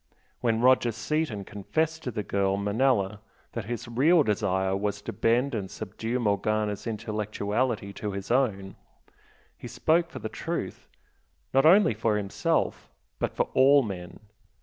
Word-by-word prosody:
When 115 Hz, -1 st, +1 dB
Roger 125 Hz, -1 st, +4 dB
Seaton 115 Hz, -2 st, -2 dB
confessed 160 Hz, +12 st, -2 dB
to -, -, -4 dB
the 105 Hz, -3 st, -3 dB
girl 100 Hz, 0 st, 0 dB
Manella 105 Hz, -1 st, +1 dB, 0.3 s
that 115 Hz, -4 st, -5 dB
his 120 Hz, +1 st, -5 dB
real 150 Hz, +8 st, +4 dB
desire 95 Hz, -3 st, 0 dB
was 100 Hz, +1 st, -2 dB
to -, -, -5 dB
bend 125 Hz, +4 st, +1 dB
and 100 Hz, -4 st, -3 dB
subdue 110 Hz, +3 st, -4 dB
Morgana's 105 Hz, -1 st, 0 dB
intellectuality 105 Hz, 0 st, -2 dB
to 105 Hz, +1 st, -4 dB
his 100 Hz, +3 st, -5 dB
own, 105 Hz, -7 st, 0 dB, 0.8 s
he -, -, -9 dB
spoke 170 Hz, +2 st, +1 dB
the -, -, -6 dB
truth, -, -, -5 dB, 0.7 s
not 135 Hz, +3 st, +5 dB
only 190 Hz, -, +6 dB
for 110 Hz, 0 st, 0 dB
himself 100 Hz, -2 st, -1 dB, 0.3 s
but -, -, -2 dB
for -, -, 0 dB
all 140 Hz, +1 st, +6 dB
men. 95 Hz, -3 st, -7 dB
110 Hz, 140 wpm, -27 LUFS, 100-130 Hz, 0.8 s, only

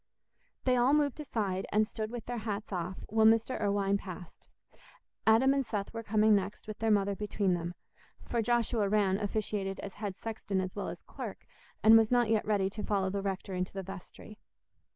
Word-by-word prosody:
They 255 Hz, -1 st, +3 dB
all 250 Hz, +4 st, +4 dB
moved 295 Hz, -1 st, +1 dB
aside, 205 Hz, -10 st, -2 dB
and 215 Hz, +1 st, +3 dB
stood 215 Hz, -1 st, -4 dB
with 240 Hz, -1 st, -6 dB
their 245 Hz, -1 st, -3 dB
hats 210 Hz, -1 st, -4 dB
off, 180 Hz, +1 st, -4 dB
while 220 Hz, +1 st, +4 dB
Mr. 225 Hz, +2 st, +3 dB
Irwine 200 Hz, -1 st, +1 dB
passed. 180 Hz, -3 st, -10 dB, 0.8 s
Adam 240 Hz, +5 st, +6 dB
and 275 Hz, -1 st, +1 dB
Seth 205 Hz, -4 st, -4 dB
were 225 Hz, -, -4 dB
coming 215 Hz, 0 st, +3 dB
next, 200 Hz, +1 st, -2 dB
with 215 Hz, -1 st, -7 dB
their 225 Hz, -, +1 dB
mother 200 Hz, -1 st, +2 dB
between 205 Hz, -2 st, 0 dB
them; 175 Hz, 0 st, -3 dB, 0.5 s
for 235 Hz, -, -1 dB
Joshua 230 Hz, -3 st, +1 dB
Rann 200 Hz, -2 st, +2 dB
officiated 205 Hz, -2 st, -2 dB
as 200 Hz, -, -7 dB
head 200 Hz, -3 st, -5 dB
sexton 215 Hz, -3 st, -3 dB
as 185 Hz, -1 st, -3 dB
well 205 Hz, -, -3 dB
as -, -, -6 dB
clerk, -, -, -8 dB, 0.4 s
and 225 Hz, +1 st, +9 dB
was 220 Hz, -1 st, +2 dB
not 245 Hz, -2 st, +3 dB
yet 220 Hz, -2 st, +1 dB
ready 200 Hz, -3 st, +2 dB
to 210 Hz, +1 st, -5 dB
follow 195 Hz, -2 st, 0 dB
the 200 Hz, 0 st, -2 dB
rector 195 Hz, -1 st, -3 dB
into 180 Hz, 0 st, -2 dB
the 195 Hz, -1 st, -4 dB
vestry. 195 Hz, +3 st, -10 dB
210 Hz, 195 wpm, -31 LUFS, 195-225 Hz, 0.8 s, and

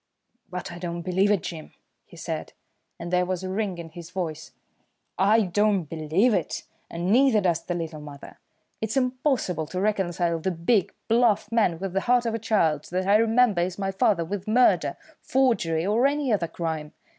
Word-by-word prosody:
"But 180 Hz, 0 st, -6 dB
I 175 Hz, -, -8 dB
don't 170 Hz, -1 st, -4 dB
believe 190 Hz, +3 st, +2 dB
it, 205 Hz, -4 st, +2 dB
Jim," 165 Hz, -3 st, -7 dB, 0.3 s
he -, -, -15 dB
said, -, -, -5 dB, 0.5 s
and 170 Hz, +1 st, -6 dB
there 180 Hz, 0 st, +3 dB
was 185 Hz, 0 st, -3 dB
a 185 Hz, -, -4 dB
ring 195 Hz, -2 st, -2 dB
in 170 Hz, -1 st, -8 dB
his 170 Hz, +1 st, -10 dB
voice. 170 Hz, -5 st, -5 dB, 0.7 s
"I 210 Hz, +4 st, +5 dB
don't 205 Hz, 0 st, +1 dB
believe 165 Hz, -, +1 dB
it, 180 Hz, -5 st, -2 dB, 0.3 s
and 175 Hz, +3 st, -2 dB
neither 250 Hz, -1 st, +5 dB
does 175 Hz, -4 st, +1 dB
the 175 Hz, -, -3 dB
little 165 Hz, -3 st, -5 dB
mother. 145 Hz, -1 st, -11 dB, 0.4 s
It's 220 Hz, +4 st, -2 dB
impossible 250 Hz, -, 0 dB
to 180 Hz, +4 st, -4 dB
reconcile 175 Hz, -4 st, 0 dB
the 190 Hz, -, -1 dB
big, 175 Hz, +3 st, +1 dB, 0.2 s
bluff 230 Hz, -2 st, +2 dB
man 215 Hz, -8 st, +2 dB
with 190 Hz, +1 st, -5 dB
the 195 Hz, -, +1 dB
heart 245 Hz, +1 st, +2 dB
of 230 Hz, -, -1 dB
a 225 Hz, -, -2 dB
child, 165 Hz, -9 st, +1 dB
that 185 Hz, +1 st, -2 dB
I 200 Hz, +2 st, +5 dB
remember 225 Hz, -3 st, +3 dB
as 180 Hz, 0 st, -2 dB
my 195 Hz, -1 st, -2 dB
father, 190 Hz, -2 st, +2 dB
with 195 Hz, +3 st, -5 dB
murder, 245 Hz, +4 st, +3 dB, 0.2 s
forgery, 190 Hz, -12 st, +1 dB
or 225 Hz, +7 st, +3 dB
any 285 Hz, -4 st, 0 dB
other 180 Hz, -5 st, 0 dB
crime. 160 Hz, -2 st, -4 dB
185 Hz, 185 wpm, -25 LUFS, 170-220 Hz, 0.7 s, I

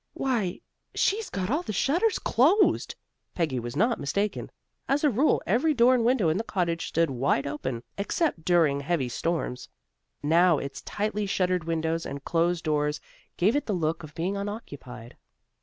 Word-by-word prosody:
"Why, 230 Hz, -9 st, -1 dB, 0.3 s
she's 425 Hz, +2 st, +1 dB
got 190 Hz, +2 st, -3 dB
all 300 Hz, +5 st, +1 dB
the 355 Hz, -, -5 dB
shutters 345 Hz, -, +1 dB
closed!" 325 Hz, -, +3 dB, 0.4 s
Peggy 155 Hz, -7 st, 0 dB
was 120 Hz, +1 st, -6 dB
not 225 Hz, -, +2 dB
mistaken. 200 Hz, +8 st, -2 dB, 0.4 s
As 280 Hz, +2 st, +1 dB
a 295 Hz, -, +4 dB
rule, 265 Hz, +7 st, +2 dB
every 270 Hz, -, +2 dB
door 245 Hz, +1 st, +5 dB
and 245 Hz, -2 st, +2 dB
window 235 Hz, -6 st, +3 dB
in 160 Hz, -, +1 dB
the 220 Hz, -, -1 dB
cottage 170 Hz, -6 st, -1 dB
stood 165 Hz, -2 st, +1 dB
wide 135 Hz, +2 st, +1 dB
open, 130 Hz, -4 st, -4 dB, 0.2 s
except 205 Hz, -, -1 dB
during 160 Hz, -6 st, +3 dB
heavy 140 Hz, -3 st, -1 dB
storms. 125 Hz, -3 st, -3 dB, 0.5 s
Now 165 Hz, +2 st, +4 dB
its 140 Hz, -1 st, -6 dB
tightly 210 Hz, 0 st, -2 dB
shuttered 185 Hz, -3 st, 0 dB
windows 165 Hz, 0 st, -1 dB
and 140 Hz, 0 st, -7 dB
closed 170 Hz, 0 st, +1 dB
doors 150 Hz, -1 st, 0 dB, 0.4 s
gave 205 Hz, +8 st, +3 dB
it 290 Hz, -, -1 dB
the 210 Hz, -, 0 dB
look 165 Hz, -2 st, -1 dB
of 155 Hz, -2 st, -11 dB
being 180 Hz, +4 st, -2 dB
unoccupied. 145 Hz, -, -7 dB
175 Hz, 165 wpm, -27 LUFS, 150-230 Hz, 0.5 s, door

